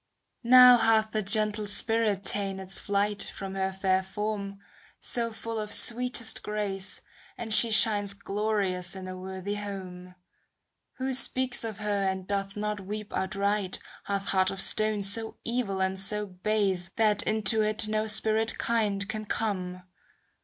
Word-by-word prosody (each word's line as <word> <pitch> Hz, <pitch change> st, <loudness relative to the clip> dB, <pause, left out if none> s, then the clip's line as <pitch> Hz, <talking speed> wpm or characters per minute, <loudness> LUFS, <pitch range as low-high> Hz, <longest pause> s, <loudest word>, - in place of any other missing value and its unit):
Now 250 Hz, +1 st, +8 dB
hath 220 Hz, -1 st, +2 dB
the 215 Hz, -, -1 dB
gentle 210 Hz, +1 st, +1 dB
spirit 210 Hz, -1 st, +1 dB
ta'en 195 Hz, -1 st, 0 dB
its 190 Hz, 0 st, +1 dB
flight 205 Hz, 0 st, -1 dB
From 195 Hz, -1 st, -5 dB
her 190 Hz, 0 st, -1 dB
fair 190 Hz, 0 st, +1 dB
form, 200 Hz, 0 st, -4 dB, 0.4 s
so 230 Hz, -1 st, 0 dB
full 225 Hz, 0 st, -5 dB
of 210 Hz, -1 st, -5 dB
sweetest 240 Hz, -1 st, +1 dB
grace. 205 Hz, -2 st, -2 dB, 0.4 s
And 225 Hz, -2 st, -1 dB
she 225 Hz, +2 st, +4 dB
shines 205 Hz, -2 st, +3 dB
glorious 195 Hz, -3 st, -2 dB
in 190 Hz, -1 st, -7 dB
a 185 Hz, -, -6 dB
worthy 190 Hz, +2 st, -6 dB
home. 185 Hz, -3 st, -7 dB, 0.8 s
Who 265 Hz, 0 st, -3 dB
speaks 255 Hz, -1 st, +2 dB
of 220 Hz, -3 st, -5 dB
her, 210 Hz, -2 st, -2 dB
and 190 Hz, -1 st, -2 dB
doth 200 Hz, 0 st, -3 dB
not 210 Hz, 0 st, -2 dB
weep 210 Hz, +2 st, -7 dB
out 190 Hz, +1 st, -2 dB
right. 200 Hz, -1 st, -1 dB, 0.3 s
Hath 200 Hz, 0 st, -3 dB
heart 185 Hz, -1 st, +2 dB
of 195 Hz, -, -5 dB
stone 215 Hz, 0 st, +1 dB
so 220 Hz, +3 st, 0 dB
evil 230 Hz, -5 st, -2 dB
and 190 Hz, 0 st, -2 dB
so 210 Hz, +2 st, -1 dB
base. 190 Hz, -2 st, -1 dB
That 215 Hz, -2 st, +2 dB
into 220 Hz, 0 st, +2 dB
it 215 Hz, 0 st, +2 dB
no 215 Hz, 0 st, -1 dB
spirit 220 Hz, +1 st, +1 dB
kind 205 Hz, -4 st, -1 dB
can 215 Hz, 0 st, -5 dB
come. 185 Hz, -5 st, -3 dB
205 Hz, 155 wpm, -28 LUFS, 195-220 Hz, 0.8 s, Now